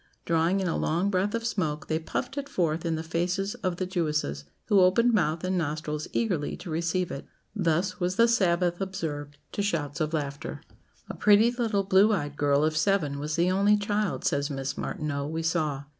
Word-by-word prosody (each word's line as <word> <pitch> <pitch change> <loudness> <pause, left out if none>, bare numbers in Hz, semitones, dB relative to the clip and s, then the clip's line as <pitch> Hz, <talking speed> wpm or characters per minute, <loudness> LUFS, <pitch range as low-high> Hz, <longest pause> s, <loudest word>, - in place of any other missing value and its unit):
Drawing 170 +3 +2
in 190 - -1
a 165 - 0
long 175 +6 0
breath 195 +3 +1
of 230 0 -3
smoke, 160 -10 -1
they 160 0 0
puffed 245 +11 -4
it 280 -1 -4
forth 165 -2 0
in 165 - 0
the 160 - -4
faces 180 +5 -1
of 185 -2 -2
the 185 - -1
Jewesses, 150 - -1 0.2
who 205 -3 +4
opened 230 +7 +4
mouth 160 -5 +1
and 185 0 0
nostrils 150 -1 -3
eagerly 180 -11 -1
to 170 - -8
receive 170 +2 -1
it. 140 - -6 0.3
Thus 180 -1 0
was 180 +1 0
the 230 +3 +5
Sabbath 180 -5 +2
observed, 150 -7 -4
to - - -2
shouts 155 -8 -2
of 155 0 0
laughter. 145 -3 -4 0.5
"A - - -6
pretty 210 +3 +5
little 230 -5 0
blue 195 +3 +5
eyed 145 -7 -2
girl 145 0 +2
of 155 0 0
seven 155 -5 +1
was 150 +1 -2
the 175 +2 +2
only 200 +2 +4
child," 205 -1 -1
says 140 +1 +1
Miss 135 -1 -3
Martineau, 145 -2 -3
"we 160 +1 -3
saw. 155 -4 0
170 Hz, 195 wpm, -27 LUFS, 150-195 Hz, 0.5 s, the